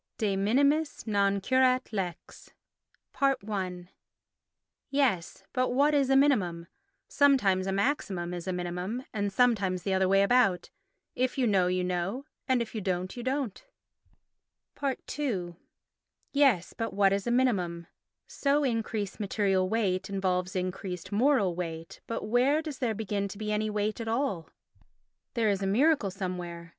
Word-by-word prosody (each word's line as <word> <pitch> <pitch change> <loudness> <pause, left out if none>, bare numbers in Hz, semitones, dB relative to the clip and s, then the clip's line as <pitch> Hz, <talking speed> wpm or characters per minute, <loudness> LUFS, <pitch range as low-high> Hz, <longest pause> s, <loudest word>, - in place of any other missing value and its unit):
De 205 -3 0
Minimis 280 +10 +1
non 200 -2 +2
Curat 255 +3 +2
Lex 185 -4 -5 0.7
i 200 -9 0 1.1
Yes, 265 - 0
but 255 0 +1
what 285 +4 +3
is 280 -2 +2
a 270 - +4
minimum? 195 -12 +2 0.4
Sometimes 210 -10 +3
a - - 0
maximum 195 -5 -1
is 175 0 -6
a - - 0
minimum, 180 +7 -3
and 205 -1 -1
sometimes 195 -6 +2
the 195 - 0
other 190 0 +2
way 195 +1 +5
about. 200 -5 +2 0.4
If 255 +1 -1
you 260 - +2
know 195 -5 +3
you 180 0 0
know, 180 +9 -2 0.2
and 255 -3 +2
if 225 - -12
you 220 - -3
don't 185 -1 -2
you 245 - -6
don't. 260 -4 -2 1.6
ii 185 -12 -2 0.8
Yes, 270 -11 +3
but 225 -4 -4
what 195 -1 +4
is 200 +3 -2
a - - +1
minimum? 185 -10 +1 0.4
So 285 +1 +1
increased 225 -5 -2
material 195 -2 +1
weight 190 -3 0
involves 190 -1 -1
increased 185 -1 -4
moral 215 -4 +3
weight, 165 -2 -6
but 230 - -3
where 260 +7 +3
does 305 -4 -6
there 235 -4 0
begin 205 -1 -2
to 200 - -9
be 210 0 -3
any 215 +1 0
weight 210 +2 -2
at 225 - -5
all? 225 - -1 0.9
There 225 -3 +2
is 195 -1 -1
a 195 - 0
miracle 260 +2 +3
somewhere. 180 -3 -5
205 Hz, 150 wpm, -29 LUFS, 185-255 Hz, 1.6 s, way